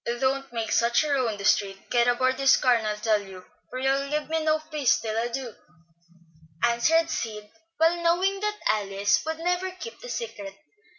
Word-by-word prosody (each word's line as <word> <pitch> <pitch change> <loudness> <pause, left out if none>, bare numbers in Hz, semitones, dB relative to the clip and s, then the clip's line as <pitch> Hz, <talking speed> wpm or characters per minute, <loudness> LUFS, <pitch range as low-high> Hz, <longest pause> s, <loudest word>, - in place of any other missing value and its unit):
"Don't 270 0 -1
make 225 -2 -3
such 235 +4 +3
a 300 - -2
row 260 -3 +2
in 215 -2 -3
the 200 - -6
street. 195 -2 0
Get 240 0 +3
aboard 255 +2 +2
this 270 0 +5
car 250 - +3
and 225 -2 0
I'll 210 0 -2
tell 210 -1 +1
you, 190 -2 -12 0.2
for 255 - -6
you'll 270 +1 0
give 300 +1 -2
me 320 0 0
no 310 0 +3
peace 305 -4 0
till 220 -1 -4
I 230 +1 0
do," 240 -1 -5 1.1
answered 310 +8 +3
Sid, 210 -2 -4 0.3
well 335 +2 +3
knowing 365 +4 +1
that 420 +1 -2
Alice 200 -1 +1
would 320 0 -2
never 355 +3 -1
keep 370 +5 -9
the - - -10
secret. 205 - -6
260 Hz, 195 wpm, -26 LUFS, 220-320 Hz, 1.1 s, this